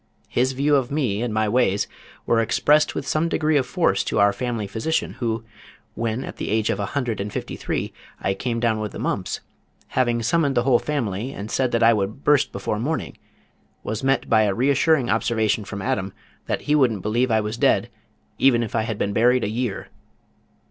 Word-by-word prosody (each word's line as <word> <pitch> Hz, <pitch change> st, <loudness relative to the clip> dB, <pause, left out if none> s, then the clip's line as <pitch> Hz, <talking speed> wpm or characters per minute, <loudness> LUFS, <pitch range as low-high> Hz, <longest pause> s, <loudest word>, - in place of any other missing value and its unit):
His 130 Hz, +2 st, +1 dB
view 145 Hz, +3 st, +2 dB
of 130 Hz, -2 st, -1 dB
me 125 Hz, -8 st, -1 dB
and 120 Hz, -2 st, -1 dB
my 110 Hz, 0 st, +1 dB
ways 105 Hz, -3 st, +2 dB, 0.4 s
were 115 Hz, -, +3 dB
expressed 145 Hz, +7 st, +3 dB
with -, -, -3 dB
some 160 Hz, +2 st, 0 dB
degree 155 Hz, -1 st, +1 dB
of 135 Hz, -3 st, +2 dB
force 125 Hz, -, +1 dB
to -, -, -2 dB
our 100 Hz, 0 st, +4 dB
family 120 Hz, -4 st, -3 dB
physician 110 Hz, +11 st, -2 dB
who, 115 Hz, -2 st, -1 dB, 0.5 s
when 115 Hz, +2 st, -2 dB
at -, -, -8 dB
the -, -, -4 dB
age 110 Hz, 0 st, +1 dB
of -, -, -2 dB
a 100 Hz, -, -1 dB
hundred 120 Hz, -7 st, -1 dB
and 105 Hz, +1 st, -4 dB
fifty -, -, -5 dB
three -, -, -3 dB, 0.3 s
I 95 Hz, -, 0 dB
came 115 Hz, +4 st, -2 dB
down 115 Hz, -2 st, +1 dB
with 105 Hz, -1 st, -4 dB
the -, -, -6 dB
mumps, -, -, -2 dB, 0.5 s
having 120 Hz, -2 st, +1 dB
summoned 140 Hz, +3 st, +1 dB
the 120 Hz, -, +3 dB
whole 125 Hz, -2 st, +4 dB
family 120 Hz, -5 st, -3 dB
and 105 Hz, +2 st, -7 dB
said 130 Hz, -2 st, +1 dB
that 115 Hz, 0 st, +2 dB
I 115 Hz, +1 st, +7 dB
would 105 Hz, +5 st, -2 dB
burst 145 Hz, -2 st, +3 dB
before 100 Hz, +2 st, -3 dB
morning, 155 Hz, +7 st, -2 dB, 0.7 s
was 110 Hz, +3 st, -4 dB
met 135 Hz, 0 st, +1 dB
by 110 Hz, -1 st, +4 dB
a 100 Hz, -2 st, 0 dB
reassuring 135 Hz, +1 st, +2 dB
observation 110 Hz, -2 st, +1 dB
from 100 Hz, -1 st, -6 dB
Adam 95 Hz, 0 st, -2 dB, 0.3 s
that -, -, -1 dB
he 150 Hz, -, 0 dB
wouldn't 120 Hz, -10 st, +2 dB
believe 120 Hz, +4 st, +1 dB
I 110 Hz, -1 st, +3 dB
was 105 Hz, +1 st, -3 dB
dead -, -, +2 dB, 0.5 s
even 120 Hz, -3 st, +4 dB
if 115 Hz, -, -6 dB
I 115 Hz, -, +1 dB
had 110 Hz, -1 st, -3 dB
been 100 Hz, -, -1 dB
buried 125 Hz, +3 st, +3 dB
a 105 Hz, -, -1 dB
year. 115 Hz, -1 st, -3 dB
115 Hz, 205 wpm, -23 LUFS, 105-130 Hz, 0.7 s, I